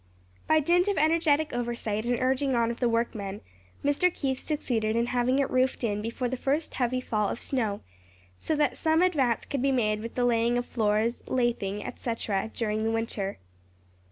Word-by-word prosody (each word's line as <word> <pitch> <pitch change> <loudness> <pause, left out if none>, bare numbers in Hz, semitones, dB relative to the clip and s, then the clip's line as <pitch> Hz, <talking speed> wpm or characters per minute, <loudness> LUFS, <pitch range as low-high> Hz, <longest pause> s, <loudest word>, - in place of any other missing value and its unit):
By 315 0 +5
dint 350 +5 +3
of 400 -3 +1
energetic 315 -1 +2
oversight 235 -2 -2
and 245 -1 +1
urging 265 +1 +1
on 235 -1 +2
of 235 - -7
the 245 - +2
workmen, 215 -4 -2 0.5
Mr. 290 +6 +3
Keith 265 -5 -2
succeeded 225 -8 -1
in 235 0 +2
having 250 +2 +1
it 280 -1 +2
roofed 255 0 +1
in 210 -2 0
before 230 +3 -2
the 255 - -2
first 285 +5 -1
heavy 255 0 0
fall 210 -4 -1
of - - -4
snow; 220 -7 -1 0.6
so 315 - 0
that 300 0 +1
some 320 +1 +3
advance 275 -10 +1
could 275 - -3
be 275 +1 +2
made 215 -5 +1
with 230 +2 -7
the 245 - +1
laying 235 0 +2
of 245 - -1
floors, 220 0 0
lathing, 230 -5 -1
etc., 220 -3 -2
during 215 -1 -1
the 225 - +1
winter. 225 -3 -2
240 Hz, 185 wpm, -28 LUFS, 225-275 Hz, 0.6 s, By